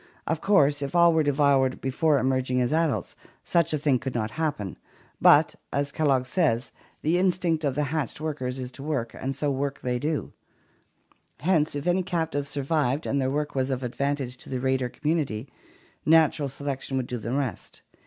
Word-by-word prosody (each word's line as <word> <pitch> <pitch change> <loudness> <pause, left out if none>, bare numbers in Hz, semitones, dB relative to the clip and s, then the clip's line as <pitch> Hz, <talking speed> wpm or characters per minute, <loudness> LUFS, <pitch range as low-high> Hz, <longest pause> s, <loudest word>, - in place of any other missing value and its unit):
Of 165 -1 -1
course 145 -8 +3
if 140 +4 -4
all 170 -1 +6
were 160 - +3
devoured 140 -3 +2
be 135 - -2
fore 155 +2 +3
emerging 130 0 +1
as 125 +3 +1
adults, 160 -3 0 0.3
such 170 -2 +2
a 155 - +1
thing 140 -3 +2
could 130 -1 -5
not 110 -1 -1
happen, 135 - -3 0.4
but, - - +6 0.2
as 140 0 -1
Kellogg 140 -5 +2
says, 130 -4 0 0.3
the 165 +4 +2
instinct 175 -3 +1
of 140 -3 0
the 150 - +1
hatched 150 -5 -2
workers 140 -5 -3
is 125 -1 -5
to 130 - -11
work, 135 -6 -2
and 135 +1 -4
so 145 -1 -1
work 140 +1 -2
they 125 -1 -1
do; 150 +3 -2 1.1
hence 160 -3 +2
if 145 - -4
any 180 +1 +2
captives 160 -6 -2
survived 140 0 0
and 140 0 0
their 130 - +1
work 150 +2 -2
was 130 0 0
of 130 -1 -2
advantage 135 0 -2
to - - -13
the 130 - -2
raider 130 -1 0
community, 145 -6 -2 0.6
natural 155 -2 +4
selection 135 -1 -4
would 130 - -1
do 125 0 -4
the 115 +2 -5
rest. 130 -7 -4
140 Hz, 185 wpm, -26 LUFS, 130-155 Hz, 1.1 s, all